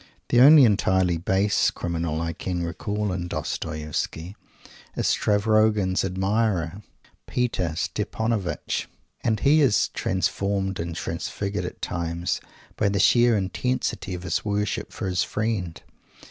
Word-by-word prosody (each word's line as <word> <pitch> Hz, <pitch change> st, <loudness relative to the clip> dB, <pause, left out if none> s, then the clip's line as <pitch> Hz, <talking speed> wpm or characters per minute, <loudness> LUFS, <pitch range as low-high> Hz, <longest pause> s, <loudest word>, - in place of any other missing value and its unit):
The 120 Hz, -, +5 dB
only 145 Hz, +2 st, +9 dB
entirely 95 Hz, -5 st, +2 dB
base 95 Hz, +4 st, +2 dB
criminal 85 Hz, -2 st, -3 dB
I 85 Hz, 0 st, -2 dB
can 90 Hz, +1 st, -3 dB
recall 105 Hz, +5 st, -2 dB
in 90 Hz, -1 st, -3 dB
Dostoievsky 80 Hz, +1 st, -4 dB, 0.6 s
is -, -, -1 dB
Stavrogin's 105 Hz, -2 st, +2 dB
admirer, 95 Hz, -1 st, 0 dB, 0.5 s
Peter 95 Hz, -10 st, -1 dB
Stepanovitch, 100 Hz, +3 st, -2 dB, 0.4 s
and 110 Hz, -2 st, 0 dB
he 150 Hz, +2 st, +5 dB
is 130 Hz, -8 st, +3 dB
transformed 95 Hz, +1 st, -1 dB
and 85 Hz, 0 st, -4 dB
transfigured 100 Hz, +5 st, -3 dB
at -, -, -8 dB
times 85 Hz, 0 st, -2 dB, 0.4 s
by 105 Hz, -, +2 dB
the 100 Hz, -, -1 dB
sheer 120 Hz, +2 st, +5 dB
intensity 100 Hz, -1 st, -2 dB
of 90 Hz, -, -8 dB
his 95 Hz, -, -1 dB
worship 105 Hz, -1 st, -2 dB
for -, -, -5 dB
his 90 Hz, -1 st, 0 dB
friend. 105 Hz, -6 st, -2 dB
95 Hz, 120 wpm, -25 LUFS, 85-105 Hz, 0.6 s, only